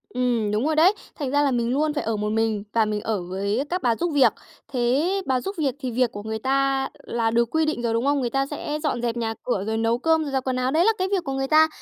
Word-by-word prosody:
Ừm, 240 -4 0
đúng 215 +5 0
rồi 315 0 +1
đấy. 340 +6 +6 0.2
Thành 280 -4 -3
ra 290 +1 +3
là 280 - +2
mình 235 -2 0
luôn 300 +2 +1
phải 295 - -2
ở 225 0 -1
một 210 0 -2
mình 220 -1 0
và 225 -1 +3
mình 210 -1 -2
ở 215 -3 -2
với 200 +6 -1
các 360 +1 -1
bà 235 -2 +2
giúp 345 +7 -1
việc. 280 -3 +5 0.3
Thế 255 +4 +1 0.2
bà 260 -2 +1
giúp 390 +7 -5
việc 280 -5 0
thì 260 -3 -3
việc 245 0 +1
của 205 - -7
người 220 0 -4
ta 270 +2 +1 0.2
là 230 -1 -1
được 235 0 +2
quy 320 0 +2
định 310 -5 -1
rồi, 235 -1 0
đúng 230 +3 0
không? 285 0 +2
Người 245 - -1
ta 270 +2 0
sẽ 295 +1 -4
dọn 255 -6 -1
dẹp 240 -1 -1
nhà 225 -1 -1
cửa 220 -6 -1
rồi 220 0 -1
nấu 225 +1 +1
cơm, 320 +4 +2
rồi 290 - -4
giặt 265 -1 0
quần 260 -1 -1
áo, 255 +1 0
đấy 325 +4 +3
là 450 - +6
cái 370 - 0
việc 380 -3 +1
của 275 - -4
người 270 0 -1
ta. 315 +2 +6
255 Hz, 295 wpm, -24 LUFS, 225-290 Hz, 0.3 s, đấy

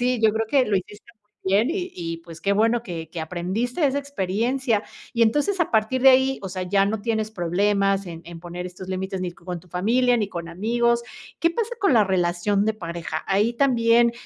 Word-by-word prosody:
sí, 250 -1 +1
yo 220 - +6
creo 225 0 0
que 260 +3 +3
lo 205 - +2
hiciste 205 +5 -7
muy 210 -2 -48 0.2
bien 205 +8 +3
y 365 +1 -3
y 165 -1 -4
pues 165 -1 -12
qué 200 - +2
bueno 225 +3 +2
que 170 -7 -6
que 170 - -5
aprendiste 185 - -3
de 295 - +5
esa 275 +1 0
experiencia. 240 -2 -1 0.3
Y 235 - +3
entonces, 295 - +2
a 340 - +1
partir 220 +4 +1
de 270 - +9
ahí, 265 +1 +3
o 195 - -4
sea, 185 0 -4
ya 195 +2 +2
no 205 +2 -1
tienes 220 -1 -1
problemas 195 +1 +1
en 165 -1 -7
en 170 -1 -9
poner 175 +1 -6
estos 180 +1 -10
límites 190 0 -3
ni 180 -1 -3
co 175 - -22
con 180 -1 -3
tu 180 - -22
familia 240 +8 +2
ni 210 - -1
con 170 -3 -6
amigos. 235 +6 +1 0.4
¿Qué 335 - +4
pasa 460 +5 -2
con 395 -10 +3
la 220 -3 +5
relación 190 +2 +1
de 220 - +1
pareja? 170 -4 -5
¿Ahí 205 +4 +2
también 235 -2 +4
210 Hz, 225 wpm, -23 LUFS, 180-240 Hz, 0.4 s, de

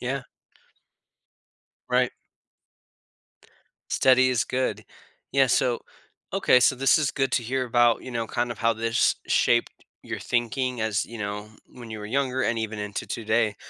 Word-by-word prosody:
Yeah. 135 +2 -3 1.7
Right. 125 0 +2 1.8
Steady 130 0 +4
is 125 0 +1
good. 130 0 -2 0.5
Yeah, 135 -2 +4
so 120 +1 +2 0.5
okay, 125 - +4
so 130 +1 +4
this 135 +4 +4
is 150 -3 +1
good 135 -1 -1
to 120 - +1
hear 130 +2 -1
about, 120 -1 +3
you 130 - -7
know, 115 -1 -1
kind 120 0 -1
of 110 - -14
how 115 0 +2
this 115 0 +1
shaped 120 0 +1 0.2
your - - -5
thinking 125 0 -1
as, 110 -2 0
you 115 -1 -10
know, 105 +1 -4 0.2
when 120 -3 -12
you 110 - -6
were 105 - -7
younger 130 +1 0
and 115 - 0
even 110 -1 -4
into 105 0 -4
today. 110 -2 0
120 Hz, 155 wpm, -25 LUFS, 110-130 Hz, 1.8 s, Steady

